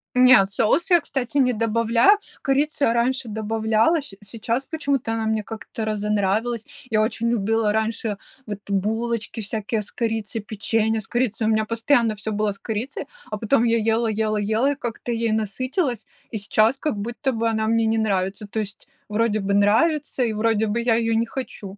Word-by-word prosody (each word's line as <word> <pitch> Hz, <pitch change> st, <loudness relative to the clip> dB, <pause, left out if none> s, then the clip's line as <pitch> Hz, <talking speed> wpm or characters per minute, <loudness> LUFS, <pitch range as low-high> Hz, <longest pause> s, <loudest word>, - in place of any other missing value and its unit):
Не, 250 Hz, -5 st, +7 dB
соус 230 Hz, -, +1 dB
я, 345 Hz, -, +7 dB
кстати, 270 Hz, -1 st, -3 dB
не 255 Hz, -2 st, +4 dB
добавляю. 230 Hz, -, +3 dB, 0.2 s
Корицу 285 Hz, +2 st, +1 dB
я 230 Hz, -, +2 dB
раньше 250 Hz, +1 st, 0 dB
добавляла, 220 Hz, +7 st, +1 dB
щ 235 Hz, -8 st, -8 dB
сейчас 230 Hz, +5 st, -3 dB
почему-то 280 Hz, -7 st, -1 dB
она 225 Hz, -1 st, -1 dB
мне 220 Hz, -1 st, 0 dB
как-то 220 Hz, +1 st, -6 dB
разонравилась. 210 Hz, +2 st, 0 dB, 0.3 s
Я 215 Hz, -1 st, +3 dB
очень 230 Hz, +1 st, 0 dB
любила 225 Hz, -1 st, +1 dB
раньше 220 Hz, -1 st, -1 dB, 0.3 s
вот 205 Hz, -2 st, -5 dB
булочки 225 Hz, +3 st, -1 dB
всякие 215 Hz, +1 st, -2 dB
с 205 Hz, -, -9 dB
корицей, 225 Hz, -1 st, -2 dB
печенье 220 Hz, +2 st, 0 dB
с -, -, -11 dB
корицей. 235 Hz, -3 st, 0 dB
У -, -, +3 dB
меня 220 Hz, 0 st, +2 dB
постоянно 230 Hz, +1 st, +2 dB
всё 210 Hz, +1 st, -4 dB
было 210 Hz, 0 st, 0 dB
с 200 Hz, -, -8 dB
корицей, 225 Hz, +4 st, -4 dB, 0.3 s
а 215 Hz, -, -2 dB
потом 225 Hz, +3 st, +2 dB
я 230 Hz, 0 st, +3 dB, 0.2 s
ела 230 Hz, 0 st, +1 dB
ела 215 Hz, 0 st, 0 dB
ела, 220 Hz, +7 st, +1 dB
и -, -, -2 dB
как-то 240 Hz, -2 st, -5 dB
ей 230 Hz, -1 st, 0 dB
насытилась, 240 Hz, -, -1 dB, 0.3 s
и -, -, -1 dB
сейчас 215 Hz, +5 st, +2 dB
как 295 Hz, -4 st, -2 dB
будто 240 Hz, +6 st, -2 dB
бы 230 Hz, -1 st, -1 dB
она 220 Hz, -1 st, 0 dB
мне 230 Hz, 0 st, +2 dB
не 225 Hz, 0 st, +1 dB
нравится. 200 Hz, -1 st, -1 dB
То 220 Hz, -, -3 dB
есть 205 Hz, -1 st, -6 dB, 0.2 s
вроде 215 Hz, 0 st, +1 dB
бы 200 Hz, 0 st, -1 dB
нравится, 260 Hz, +7 st, +2 dB
и 225 Hz, -2 st, 0 dB
вроде 220 Hz, 0 st, +1 dB
бы 215 Hz, +3 st, 0 dB
я 235 Hz, -1 st, +2 dB
её 230 Hz, 0 st, +1 dB
не 230 Hz, +1 st, +2 dB
хочу. 210 Hz, -6 st, -7 dB
225 Hz, 185 wpm, -23 LUFS, 215-240 Hz, 0.3 s, Не